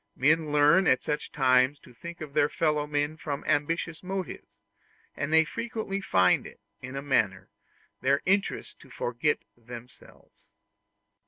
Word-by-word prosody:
Men 155 +2 +2
learn 150 +5 +5
at 130 - +3
such 150 0 -3
times 130 0 +3
to 125 - -16
think 170 +7 -9
of 150 -3 -7
their 145 - +3
fellow 150 -2 0
men 145 +1 -1
from 145 -2 -5
ambitious 165 +2 0
motives; 190 0 -5 0.7
and 145 +1 -3
they 160 0 +6
frequently 220 -2 -4
find 90 - +3
it, - - -15 0.2
in 130 +1 -7
a 135 - -4
manner, 100 -9 0 0.5
their 140 +2 +2
interest 195 +1 0
to - - -17
forget 125 +5 -1
themselves. 120 +1 -14
145 Hz, 145 wpm, -28 LUFS, 130-165 Hz, 0.7 s, they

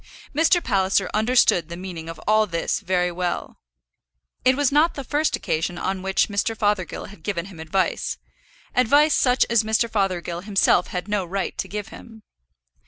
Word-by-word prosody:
Mr. 330 +4 +3
Palliser 195 -2 +1
understood 215 -7 +3
the 170 - -6
meaning 175 -3 -7
of 165 - -8
all 215 0 +4
this 170 -3 -1
very 180 -1 0
well. 175 0 -4 0.8
It 255 +1 +4
was 285 -2 +2
not 300 +4 +3
the 275 - -5
first 295 +4 0
occasion 165 +3 -2
on 190 +1 -2
which 190 0 +1
Mr. 215 +2 -1
Fothergill 205 -4 -1
had 205 - -14
given 180 -5 -3
him 190 -4 -12
advice, 175 +4 -1 0.6
advice 285 +5 +4
such 250 0 +3
as 235 -2 +3
Mr. 220 +2 +1
Fothergill 185 -5 -2
himself 195 -2 +2
had 180 +1 -5
no 205 -2 0
right 190 +2 -3
to - - -2
give 210 0 -5
him. 225 -2 -13
200 Hz, 170 wpm, -23 LUFS, 180-235 Hz, 0.8 s, all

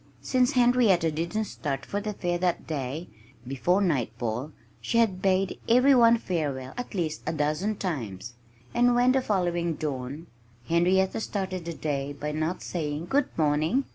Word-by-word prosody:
Since 255 +1 +2
Henrietta 240 - +4
didn't 170 +8 -2
start 145 -8 -4
for 205 - -3
the 210 0 -3
fair 175 -3 -2
that 180 -1 0
day, 150 +2 -4 0.4
before 175 +9 +1
nightfall 125 - -1 0.3
she 230 - -1
had 205 -6 +2
bade 190 0 +1
every 255 +4 +6
one 235 -2 +6
farewell 145 - -3
at 245 -3 -6
least 160 -4 -2
a - - 0
dozen 155 +8 0
times. 120 - -4 0.4
And 245 0 +4
when, 245 +1 +4
the 265 0 +2
following 175 -6 0
dawn, 140 +1 -4 0.4
Henrietta 185 +4 +2
started 190 -5 -3
the 170 - -4
day 145 -2 -3
not - - -22 0.4
by - - -11
saying 155 -2 -3
"Good 280 -1 +2
morning!" 155 - +2
175 Hz, 155 wpm, -27 LUFS, 150-215 Hz, 0.4 s, every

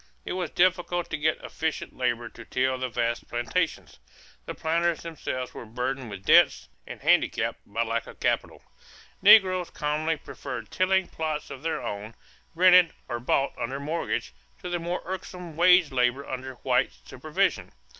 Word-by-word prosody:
It - - -3
was 180 -3 -2
difficult 175 -1 +1
to - - 0
get 155 +1 +1
efficient 160 0 -3
labor 120 -2 -1
to 115 - -12
till 130 +2 0
the 130 0 -2
vast 120 0 -2
plantations. 120 - -2 0.5
The - - -5
planters 170 +1 0
themselves 145 -6 -5
were - - -8
burdened 125 +2 -4
with 100 -2 -9
debts - - +5 0.2
and - - -8
handicapped - - +2
by 115 +3 -1
lack 115 0 -2
of - - -12
capital. - - -1 0.6
Negroes 185 -4 +6
commonly 155 +2 -1
preferred 135 -2 -7
tilling 190 0 +2
plots 155 -2 -4
of 135 -1 -8
their 165 +1 -2
own, 105 +2 -5 0.4
rented 180 -1 +6
or 120 -2 -3
bought 135 +3 +1
under 135 +4 -3
mortgage, 145 - -3 0.3
to 180 - -4
the 175 0 -1
more 175 +2 -3
irksome 180 -2 -7
wage 180 -1 +5
labor 125 +2 +1
under 130 0 -5
white - - +1
supervision. - - -1
150 Hz, 155 wpm, -27 LUFS, 125-175 Hz, 0.6 s, Negroes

